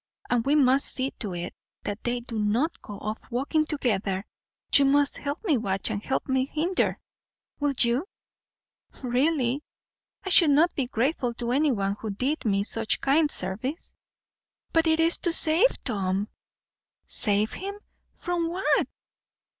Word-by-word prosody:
And 240 -2 +2
we 280 +4 +2
must 275 -1 +3
see 265 +1 0
to 200 -6 -4
it 175 +1 -5 0.3
that 205 +1 -5
they 240 0 -2
do 230 -2 -5
not 230 +10 0
go 205 - -9
off 215 +2 -5
walking 280 +6 0
together. 210 -10 -2 0.5
You 280 - +7
must 285 +1 +2
help 285 +6 -5
me 325 -10 +2
watch 195 -1 -2
and 205 -1 -4
help 265 - -2
me 260 0 0
hinder. 340 +6 -1 0.6
Will 290 -1 0
you?" 245 +9 +2 1.0
"Really, 260 +1 0 0.6
I - - -2
should 340 -3 +8
not 310 +5 +3
be 265 -4 -2
grateful 245 0 -1
to 240 0 -3
anyone 240 -8 0
who 220 - -5
did 255 +10 -2
me 200 -2 +1
such 225 +1 -2
kind 295 +3 +2
service." 225 - -3 0.8
"But 325 0 +3
it 320 0 +2
is 330 +1 +3
to 345 - +1
save 330 +8 +6
Tom." 200 -3 -2 0.8
"Save 210 -1 +3
him! 400 +1 -6 0.4
From 345 -2 -2
what?" 365 +3 +1
260 Hz, 150 wpm, -26 LUFS, 215-305 Hz, 1.0 s, should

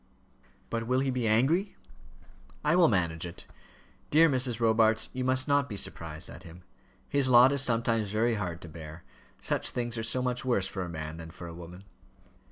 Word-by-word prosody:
"But 115 -1 -3
will 125 +1 +2
he 135 -1 0
be 125 -3 -1
angry?" 145 - +2 0.9
"I 150 +3 +3
will 175 -2 +6
manage 85 -6 0
it. 85 -1 -8 0.6
Dear 160 +2 +6
Mrs. 125 -3 0
Robarts, 110 -1 +2
you 130 - -3
must 130 +1 +1
not 140 -1 +2
be 105 - -4
surprised 80 -4 -4
at - - -11
him. 90 0 -13 0.4
His 140 -2 +2
lot 125 +2 +7
is 140 -1 +2
sometimes 115 -3 +1
very 110 +3 +1
hard 90 -5 -4
to - - -9
bear: 80 +1 -10 0.4
such - - 0
things 120 -1 -3
are - - -3
so 120 +3 0
much 125 -1 -2
worse 120 -7 +1
for 95 - -5
a 90 - -4
man 80 -1 -6
than 80 -1 -8
for 85 - -10
a 85 - -8
woman." 90 +2 -11
115 Hz, 190 wpm, -29 LUFS, 90-130 Hz, 0.9 s, lot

